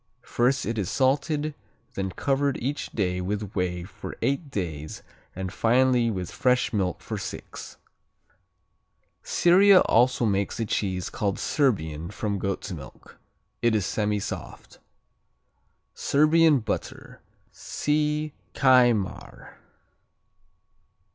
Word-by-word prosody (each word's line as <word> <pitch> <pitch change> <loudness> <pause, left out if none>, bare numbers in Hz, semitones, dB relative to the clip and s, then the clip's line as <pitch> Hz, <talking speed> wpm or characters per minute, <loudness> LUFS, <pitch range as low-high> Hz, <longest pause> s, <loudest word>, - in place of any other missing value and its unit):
First 125 +3 +1
it 115 -1 -2
is 95 - -2
salted, 145 +3 +1 0.4
then 95 0 -2
covered 140 +7 0
each 140 +5 -3
day 90 -4 -1
with 100 +2 -3
whey 90 -2 -2
for 90 - -9
eight 140 +2 -1
days 80 - -5 0.3
and 95 0 -5
finally 125 +1 +3
with 90 -5 -4
fresh 125 -2 +1
milk 95 -4 -1
for - - -5
six. - - -8 1.4
Syria 185 +2 +5
also 120 +1 +3
makes 100 +1 -1
a 115 - 0
cheese 95 -4 -2
called 100 -2 -1
Serbian 85 - 0
from 100 -1 -3
goat's 100 +1 -3
milk. 70 -8 -11 0.4
It 120 -2 +3
is 105 -4 +1
semisoft. 105 0 -4 1.1
Serbian 155 -1 +4
Butter 110 - -5 0.3
see 150 0 -1 0.2
Kajmar. 120 -6 +2
115 Hz, 105 wpm, -26 LUFS, 95-140 Hz, 1.4 s, Syria